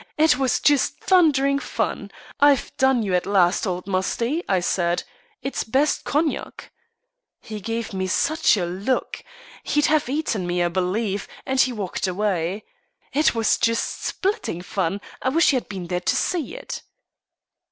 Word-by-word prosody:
It 305 -4 +4
was 265 -2 +2
just 290 -2 +2
thundering 280 -7 +3
fun. - - -3 0.3
'I've 285 -2 +3
done 265 -3 +3
you 195 -3 -2
at 180 - +1
last, 190 0 +3
old 180 -1 -3
Musty,' 230 - -1
I 190 - +3
said. 175 0 0 0.4
'It 270 - -4
is - - 0
best 270 +7 +1
cognac.' 300 +1 -2 0.7
He 215 -1 -8
gave 230 +1 -4
me 190 -1 -2
such 315 - +2
a 180 - 0
look! 195 +9 -2 0.4
He'd 295 0 +1
have 305 -4 +2
eaten 255 - -1
me, 175 0 +1
I 175 - +1
believe 190 +3 -1 0.2
and 265 0 +2
he 255 - +2
walked 200 -4 -3
away. 185 0 -1 0.5
It 300 -3 +3
was 225 -2 +2
just 230 0 0
splitting 375 - -2
fun. 195 -1 -2 0.2
I 260 - +1
wish 325 +5 +4
you - - +3
had 250 - -5
been 190 -3 -5
there 180 +1 -2
to 180 - 0
see 350 - -1
it." - - -6
225 Hz, 165 wpm, -23 LUFS, 185-280 Hz, 0.7 s, It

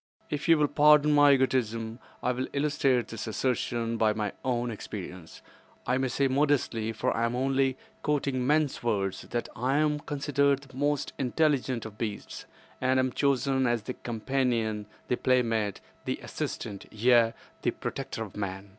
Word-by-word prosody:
If 150 +2 -2
you 165 - +7
will 150 -1 +3
pardon 150 +1 +5
my 145 -1 +7
egotism, 115 -4 0 0.2
I 125 - +2
will 130 +1 -2
illustrate 140 -4 +1
this 115 -1 -5
assertion 115 0 -1
by 110 -1 +3
my 105 -2 -2
own 120 -2 0
experience. 95 -5 -8 0.4
I 130 - +1
may 130 - +1
say 135 +2 +1
modestly—for 130 -5 +1
I 115 - 0
am 115 +1 -1
only 135 0 +1 0.2
quoting 140 -4 0
men's 150 -1 +2
words—that 100 0 -2
I 130 +4 +1
am 150 -1 +2
considered 140 -1 +1
the 135 -2 -16
most 145 +1 0
intelligent 130 -3 +1
of 110 -1 -9
beasts, 105 -3 -5 0.4
and 130 0 +3
am 130 0 +1
chosen 135 -1 +1
as 120 -2 0
the 125 - -4
companion, 115 -3 -1 0.2
the 125 - 0
playmate, 115 -5 +1 0.2
the - - -1
assistant, 100 -2 -5
yea, 115 +1 +4 0.3
the - - +1
protector 110 - -4
of 105 - -10
man. 100 -1 -4
125 Hz, 155 wpm, -28 LUFS, 115-140 Hz, 0.4 s, you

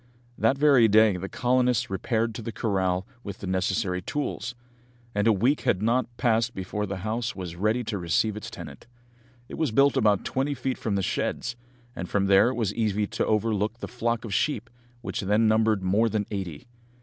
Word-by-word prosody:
That 115 +5 +2
very 140 -5 +6
day 110 -1 +5
the 95 +2 -5
colonists 125 -3 +1
repaired 115 +3 -1
to 115 - -6
the 115 - -5
corral 95 -5 0 0.2
with 100 -1 -6
the - - -8
necessary 95 0 0
tools, 125 0 -3 0.6
and 105 +2 +1
a - - +6
week 120 +8 +2
had 105 -6 +1
not 120 +3 +2
passed 115 0 +1
before 105 +2 -3
the 95 0 -4
house 115 +2 -2
was 90 -3 -6
ready 110 +7 0
to 105 -3 -3
receive 90 +5 +1
its 105 +2 -6
tenant. 115 +1 -10 0.6
It - - -8
was 160 -3 +1
built 140 +5 +4
about 105 -2 +2
twenty 140 +2 -1
feet 130 0 -3
from 105 -3 -1
the 100 - 0
sheds, 120 - -2 0.4
and 90 - -5
from 100 -1 +1
there 100 +4 +5
it 130 - -3
was 115 -5 -1
easy 105 -2 0
to - - -2
overlook 110 0 0
the - - -6
flock 120 -1 -2
of 105 - -5
sheep, 120 -1 -1 0.3
which - - -4
then 105 +3 +2
numbered 110 -2 +2
more 105 +5 +2
than 105 -1 -1
eighty. 95 - -5
110 Hz, 195 wpm, -26 LUFS, 100-120 Hz, 0.6 s, very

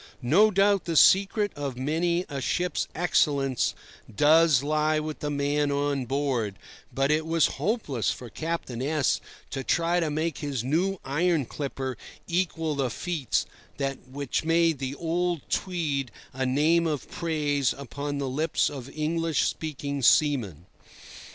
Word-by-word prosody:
No 190 - +5
doubt 200 -1 +3
the 165 - -2
secret 200 +4 +5
of 140 -3 -4
many 170 +6 0
a 140 -1 -5
ship's 180 +8 -1
excellence 140 -6 +1 0.4
does 150 +3 +5
lie 155 +1 +1
with 155 0 -5
the 150 - -3
man 145 0 0
on 140 -2 0
board, 130 -7 -1 0.4
but 135 +2 +1
it 155 +1 +2
was 165 0 +2 0.2
hopeless 185 - 0
for 125 - -4
Captain 155 -3 -4
S— 145 0 +1 0.3
to 135 -1 -3
try 170 +3 +1
to 165 -3 0
make 155 +1 -2
his 140 -6 -3
new 175 +9 0
iron 160 +1 +1
clipper 135 -2 -4 0.3
equal 165 -3 -1
the 135 -3 -1
feats 155 +2 -1 0.7
which 140 0 -2
made 165 -2 +2
the 135 0 -3
old 170 0 -1
Tweed 150 -8 -1 0.2
a 130 0 -1
name 160 +6 +3
of 150 -4 -3
praise 145 -6 0
upon 140 +1 -5
the 140 -1 -2
lips 150 +3 0
of 135 -2 -7
English 160 0 0
speaking 145 -2 -4
seamen. 115 - +3
150 Hz, 140 wpm, -27 LUFS, 135-165 Hz, 0.7 s, No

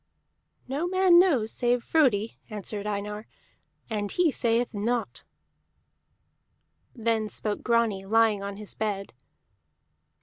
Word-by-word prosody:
"No 285 +7 -2
man 370 -1 +5
knows 270 - +3
save 240 0 +1
Frodi," 230 -9 +1
answered 210 -1 -5
Einar, 210 +1 -4 0.6
"and 205 -3 -3
he 350 -3 +2
sayeth 235 -1 0
not." 230 +3 -2 1.7
Then 225 -2 0
spoke 210 -1 -2
Grani, 230 -5 +1
lying 220 -1 +3
on 200 0 -5
his 210 -1 -5
bed. 200 - -3
225 Hz, 105 wpm, -27 LUFS, 210-245 Hz, 1.7 s, man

